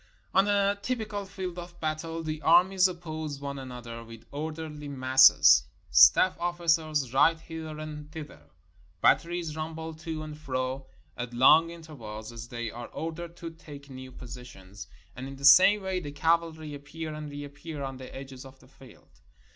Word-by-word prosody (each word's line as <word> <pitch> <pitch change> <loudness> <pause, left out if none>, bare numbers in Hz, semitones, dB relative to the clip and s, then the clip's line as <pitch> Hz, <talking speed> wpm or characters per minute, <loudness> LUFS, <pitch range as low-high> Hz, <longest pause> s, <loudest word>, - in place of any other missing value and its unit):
On 195 +2 +4
a 200 0 +2
typical 215 -3 -3
field 185 -2 -6
of 175 0 -10
battle 160 +1 -3
the 155 -1 -4
armies 180 +3 +5
oppose 160 -5 -6
one 140 -1 -5
an 130 -1 -8
other 115 -1 -8
with 115 -1 -13
orderly 155 0 -6
masses. 130 - +6 0.3
Staff 185 - +6
ofiicers 160 -6 0
ride 160 +4 +4
hither 160 -2 -7
and 150 -1 -8
thither. 145 - -10 0.5
Batteries 170 - +2
rumble 160 +1 -5
to 160 0 -6
and 155 -1 -7
fro 130 -2 -4 0.3
at 120 0 -6
long 155 +7 +6
intervals, 120 -10 -9
as 115 0 -8
they 120 -2 -5
are 120 +1 -8
ordered 165 +1 -6
to 170 -1 -7
take 145 -3 -12
new 130 0 -9
positions, 110 -6 -11 0.3
and 130 +2 -6
in 135 - -8
the 140 +1 -5
same 190 +8 +8
way 190 -1 -1
the 145 -5 -7
cavalry 160 0 0
appear 155 +2 -7
and 150 -1 -6
reappear 145 +1 -7
on 135 -1 -5
the 130 0 -10
edges 135 -1 -9
of 135 0 -14
the 130 - -20
field. 130 -2 -19
155 Hz, 165 wpm, -28 LUFS, 130-165 Hz, 0.5 s, same